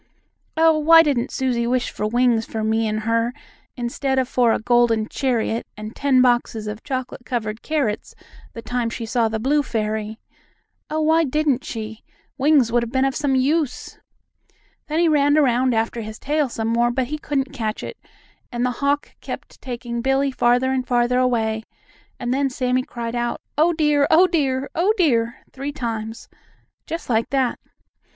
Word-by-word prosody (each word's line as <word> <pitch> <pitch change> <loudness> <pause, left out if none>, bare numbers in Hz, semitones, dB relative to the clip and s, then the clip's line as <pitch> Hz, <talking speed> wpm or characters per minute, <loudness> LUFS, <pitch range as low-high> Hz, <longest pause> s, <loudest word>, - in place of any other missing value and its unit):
Oh, 320 -1 +5
why 325 +2 +7
didn't 275 -4 0
Susie 245 -3 -1
wish 250 0 0
for 210 - -2
wings 240 0 +2
for 220 -1 -4
me 220 +1 +1
and 215 0 -2
her 230 +2 0 0.4
instead 265 +3 -2
of 260 -1 +2
for 245 -2 +3
a - - +2
golden 235 -2 +2
chariot 235 -4 -1
and 215 +1 -8
ten 265 -3 +3
boxes 240 -3 +1
of 210 +1 -5
chocolate 260 -2 -4
covered 220 -3 -3
carrots 275 -9 -2 0.4
the 230 - -8
time 245 -2 -1
she 230 0 -5
saw 230 0 +1
the 220 - -2
blue 280 +7 +2
fairy? 220 -3 -3 0.7
Oh, 310 +1 -1
why 320 +1 +4
didn't 290 -2 0
she? 220 -3 -6 0.3
Wings 280 -4 +3
would 240 0 +3
have 235 -1 -4
been 260 +1 +2
of 270 -1 0
some 285 -3 +1
use!" 280 +1 0 0.9
Then 310 +1 -2
he 340 0 +4
ran 290 -1 +3
around 255 -3 +3
after 225 +1 -1
his 215 0 -7
tail 295 -1 0
some 225 -1 -3
more, 235 +1 +2
but 250 +1 0
he 305 0 -3
couldn't 280 -2 -2
catch 220 -5 -3
it, - - -7 0.5
and 240 0 -1
the 250 - +1
hawk 285 +1 0
kept - - -8
taking 240 -2 -5
Billie 270 +2 +1
farther 250 +1 +2
and 255 -1 -1
farther 245 0 +2
away, 225 -3 +1 0.6
and 245 0 -1
then 275 +1 +1
Sammie 255 -1 0
cried 235 -2 -6
out: 240 0 -2 0.2
"Oh, 320 +4 +4
dear! 300 -3 +2
Oh, 345 +4 +6
dear! 280 -6 0
Oh, 385 +6 +2
dear!" 235 -8 +2 0.2
three 275 +2 -4
times, 225 -5 -5 0.6
just 330 +1 -5
like 230 -2 +1
that. 265 -3 0
250 Hz, 175 wpm, -22 LUFS, 230-280 Hz, 0.9 s, why